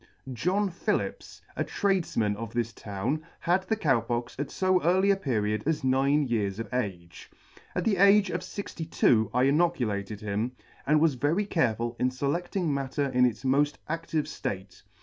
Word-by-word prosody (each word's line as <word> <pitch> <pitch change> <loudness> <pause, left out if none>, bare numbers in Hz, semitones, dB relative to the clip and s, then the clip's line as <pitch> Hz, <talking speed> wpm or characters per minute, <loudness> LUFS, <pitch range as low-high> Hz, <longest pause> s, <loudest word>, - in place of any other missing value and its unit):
JOHN 185 - 0
PHILLIPS, 170 - -3
a - - 0
Tradefman 170 - 0
of 115 +1 -7
this 115 -1 -1
town, 110 +9 -3 0.2
had 180 +2 +2
the 220 - +1
Cow 145 - +2
Pox 120 +1 -3
at 145 -1 -3
fo 185 -1 +2
early 190 +4 +3
a - - +4
period 110 - -1
as 160 -3 0
nine 135 +3 +3
years 105 -6 -1
of 115 0 -6
age. 95 -9 -4 0.5
At 180 - 0
the 205 -4 +2
age 200 +1 +5
of 180 +1 -3
fixty 180 -3 -6
two 115 -8 +3
I 125 +1 +2
inoculated 125 - +1
him, 105 +4 -2 0.3
and 150 +2 +4
was 160 -1 +3
very 145 +11 0
careful 120 - 0
in 125 - +2
feledting 165 +7 -2
matter 140 +1 -1
in 125 -1 +4
its 125 +2 -2
moll 140 +3 +4 0.2
adtive 165 -1 -1
ftate. 95 -7 -6
135 Hz, 170 wpm, -28 LUFS, 115-170 Hz, 0.5 s, age